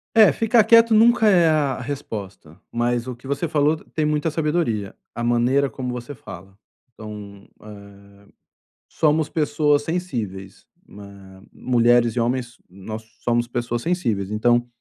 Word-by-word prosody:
É, 215 -6 +7
ficar 225 - +3
quieto 230 +1 +5
nunca 225 0 +5
é 180 -5 +5
a 145 -4 0
resposta, 105 - -7
mas 120 +1 -1
o 125 - -5
que 120 - -19
você 140 +5 -2
falou 150 0 +2 0.2
tem 155 - +1
muita 150 +1 0
sabedoria, 150 - -2 0.2
a 120 - -4
maneira 120 +4 +2
como 125 -2 -5
você 125 +3 -7
fala. 95 -6 -12 0.4
Então, 105 -2 -10 0.2
eh, 100 -1 -12 1.0
somos 155 0 +1
pessoas 150 -2 +1
sensíveis, 115 - -5 0.2
hã, 100 -2 -13
mulheres 120 -1 +2
e - - +1
homens, 120 0 -2
nós 105 +4 -8 0.2
somos 120 0 0
pessoas 120 0 -3
sensíveis. 115 - -1
Então 120 +3 +2
120 Hz, 140 wpm, -22 LUFS, 110-150 Hz, 1.0 s, É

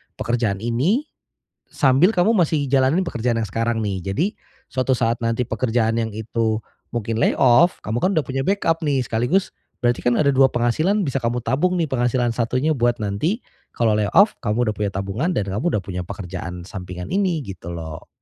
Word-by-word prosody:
pekerjaan 115 -4 -1
ini 140 - +1 0.7
sambil 135 +6 +4
kamu 180 +5 +4
masih 160 -6 +2
jalanin 135 +7 +3
pekerjaan 120 -7 -1
yang 115 - -1
sekarang, 115 +3 -1
nih. 100 -3 -2
Jadi 160 - +1 0.5
suatu 130 0 +1
saat 115 0 0
nanti 115 +2 +1
pekerjaan 115 0 0
yang 110 - -2
itu 110 0 -1 0.3
mungkin 115 -1 -2
layoff 130 +8 +4
kamu 110 +2 -1
kan 185 - +2
udah 155 - +2
punya 135 +1 -2
backup, 190 -4 +1
nih, 140 -3 +1
sekaligus 125 +12 0 0.3
berarti 120 0 +1
kan 120 -1 +2
ada 150 - +3
dua 135 0 +5
penghasilan 155 - +1
bisa 135 - -1
kamu 120 +1 0
tabung, 180 +7 +1
nih, 165 - +2
penghasilan 120 -1 +1
satunya 125 +6 0
buat 120 0 +2
nanti 105 - -1 0.4
kalau 115 -2 +2
layoff 195 - +4
kamu 115 +1 0
udah 105 - -3
punya 105 -1 -1
tabungan 100 - -2
dan 100 - 0
kamu 105 - -3
udah - - -2
punya 90 0 -4
pekerjaan 90 -1 -6
sampingan 90 -2 -7
ini 190 -5 +1
gitu 90 -3 -8
loh. 80 -2 -7
120 Hz, 180 wpm, -21 LUFS, 110-140 Hz, 0.7 s, dua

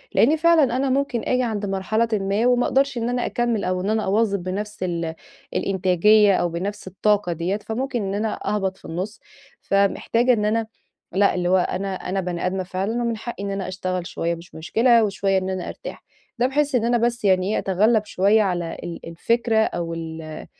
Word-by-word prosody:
لإني 300 +7 +4
فعلًا 315 -6 +4
أنا 270 +1 0
ممكن 265 -3 0
أجي 255 0 +1
عند 215 -4 -2
مرحلةٍ 205 +4 0
ما 200 +3 +1
وما 250 0 +3
أقدرش 275 -1 +1
إن 235 0 -1
أنا 245 0 -1
أكمّل 235 -1 0
أو 185 0 -1
إن 195 - -2
أنا 220 0 0
أواظب 200 -1 +1
بنفْس 205 +2 -4
ال 170 -2 -2 0.4
الإنتاجية، 195 +2 +4
أو 175 - +1
بنفْس 195 +4 -5
الطاقة 200 -1 +1
ديّة 175 +5 -1
فممكن 240 +3 -3
إن 195 0 -3
أنا 210 +1 -2 0.2
أهبط 190 -2 -2
في - - -18
النُص، 185 +7 -5 0.4
فمحتاجة 230 +5 +2
إن 210 -3 0
أنا 220 +1 0 0.5
لأ 200 +2 +3
اللي 180 -1 0
هو 190 - +5
أنا 190 +1 -1
أنا 190 +1 -3
بني 175 -1 -3
آدمة 185 +1 -1
فعلًا 195 +6 -2
ومن 230 -1 -1
حقي 220 -2 -6
إن 200 - -3
أنا 195 -1 -3
أشتغل 185 -1 -3
شوية 170 +1 -2
مش 170 +1 -14
مشكلة 230 +8 +3
وشوية 195 -1 +1
إن 190 0 -1
أنا 185 -1 -3
أرتاح، - - -8 0.4
ده 245 - +3
بحيث 285 +1 0
إن 230 -2 +2
أنا 240 0 +3
بس 235 -1 0
يعني 185 0 +3
إيه؟ - - +1
أتغلّب 215 +3 +2
شوية 205 +2 +3
على 175 -4 -1
ال 170 -1 -6
الفكرة 230 +8 0
أو 175 -6 0
ال 160 -1 -7
200 Hz, 195 wpm, -23 LUFS, 185-230 Hz, 0.5 s, هو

